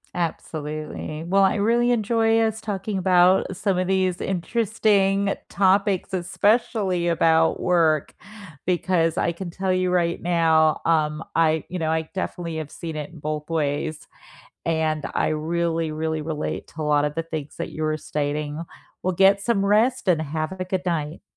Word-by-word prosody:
Absolutely. 155 -2 -4
Well, 195 +3 +3
I 190 - +3
really 235 +4 +2
enjoy 225 -1 +2
us 220 0 0
talking 205 -2 -3
about 185 +1 +4
some 195 -2 0
of 185 - 0
these 185 -1 +1
interesting 200 0 +1 0.2
topics, 195 -1 +2
especially 190 -1 +1
about 165 -1 +3
work, 165 -4 +2 0.5
because 175 -2 +1
I 170 - +1
can 175 +1 -6
tell 185 +2 -1
you 185 0 +1
right 175 -1 +1
now, 160 -2 +3
um, 155 -1 +1
I 160 -1 +3
you 180 - -5
know, 160 -1 -1
I 160 0 -1
definitely 175 -4 -4
have 155 -2 -5
seen 165 -2 -7
it 150 -1 -5
in 165 - -13
both 150 +1 -4
ways, 150 0 -2 0.6
and 160 -2 0
I - - +1
really 165 +1 -1
really 160 0 -2
relate 155 -1 -4
to 155 - -5
a - - -1
lot 150 -1 +2
of 150 0 -3
the 165 - -1
things 155 -3 -6
that - - -4
you 155 - -6
were 155 0 0
stating. 150 +1 -3 0.4
Well, 185 - 0
get 195 +2 +4
some 205 -3 +1
rest 220 +3 +2
and 165 -3 +3
have 155 +2 -3
a 185 - -2
good 185 0 -3
night. 160 -1 -2
170 Hz, 165 wpm, -23 LUFS, 155-190 Hz, 0.6 s, about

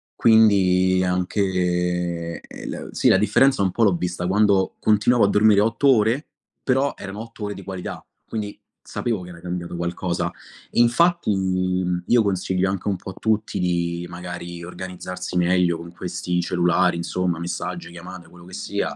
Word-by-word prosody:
Quindi 95 -5 +4
anche, 90 -2 -1
eh - - -10
la - - -6
sì - - +1
la - - +6
differenza 135 +4 +3
un 95 - +3
po' 115 - +1
l'ho 100 -5 +4
vista 90 0 -3
quando 100 -1 +2
continuavo 110 +2 +3
a - - +3
dormire 105 -1 +5
8 115 +6 +1
ore, 115 +7 +1 0.4
però 135 +2 +1
erano 100 +1 -7
8 115 -1 -9
ore 105 0 -3
di 100 - -10
qualità, 95 -1 -6 0.2
quindi 105 -2 -5 0.2
sapevo 115 -6 -3
che 90 - -10
era 85 - -12
cambiato 90 0 -5
qualcosa. 85 0 -2 0.4
Infatti, 125 +5 +3 0.7
io 120 -2 +4
consiglio 95 -1 0
anche 100 0 -4
un 100 - +1
po' 95 - -8
a - - -13
tutti 110 -1 0
di 85 -1 -1
magari 85 -1 -7
organizzarsi 90 0 -6
meglio 90 -1 +2
con 85 0 -10
questi 90 0 -3
cellulari 90 0 +2
insomma, 90 0 -1
messaggi, 85 0 -5
chiamate, 85 +1 -10
quello 85 0 -15
che 90 - -14
sia, - - -3
90 Hz, 160 wpm, -23 LUFS, 90-105 Hz, 0.7 s, la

